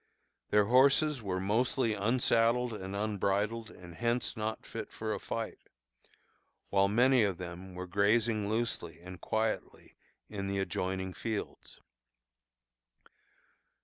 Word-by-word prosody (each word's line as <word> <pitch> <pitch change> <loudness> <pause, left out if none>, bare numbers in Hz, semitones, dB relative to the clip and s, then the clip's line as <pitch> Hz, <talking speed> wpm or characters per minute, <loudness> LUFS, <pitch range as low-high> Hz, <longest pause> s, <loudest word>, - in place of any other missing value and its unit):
Their 105 0 +4
horses 135 +4 +4
were 95 -3 -2
mostly 115 +4 +1
"unsaddled 115 +2 +2
and 95 -2 -5
unbridled, 105 +2 0
and 90 -4 -12
hence 120 +10 -1
not 110 0 -3
fit - - -6
for - - -3
a - - -3
fight," - - -4 1.1
while 100 0 +4
many 125 +5 +4
of 100 -4 +1
them 90 +1 -8
were 90 0 -5
grazing 105 +3 +2
loosely 110 -8 -2
and 90 +1 -10
quietly 110 0 -2 0.3
in 100 -2 -4
the 100 0 -1
adjoining 95 0 -2
fields. 110 0 -5
105 Hz, 115 wpm, -32 LUFS, 95-115 Hz, 1.1 s, Their